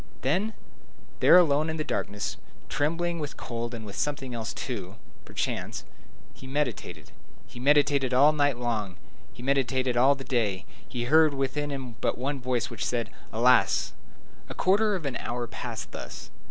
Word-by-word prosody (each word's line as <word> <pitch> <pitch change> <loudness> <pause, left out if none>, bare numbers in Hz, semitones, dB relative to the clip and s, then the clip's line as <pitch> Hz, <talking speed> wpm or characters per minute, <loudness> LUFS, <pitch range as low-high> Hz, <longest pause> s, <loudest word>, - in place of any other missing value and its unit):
Then, 190 - +1 0.7
there - - +8
alone 155 -3 +4
in 160 - -2
the 155 - -1
darkness, 100 -8 -3 0.3
trembling 170 +4 0
with 150 -1 -5
cold 120 0 -4
and 110 -1 -7
with 100 -1 -8
something 140 -2 -2
else, 115 -1 -3
too, 100 -7 -5 0.3
perchance, - - -3 0.5
he 130 - -12
meditated. 135 -5 -3 0.3
He 120 - -12
had 125 - -6
meditated 145 -2 +4
all 140 +4 +6
night 145 -4 +2
long; 110 -6 -2 0.4
he 120 - -11
had - - -7
meditated 130 -2 +1
all 130 +4 +5
the 135 - -8
day: 105 -8 0 0.2
he 120 0 -3
heard 155 +3 +5
within 135 +2 -1
him 130 -5 -6
but - - 0
one 135 +2 -2
voice, 125 0 -1
which 115 - -4
said, 120 -2 -1 0.2
"Alas!" 120 -3 +3 0.6
A - - -6
quarter 205 +2 +3
of 175 -5 -5
an 140 - -2
hour 120 0 -3
passed - - -6
thus. - - -8
130 Hz, 165 wpm, -27 LUFS, 120-145 Hz, 0.7 s, there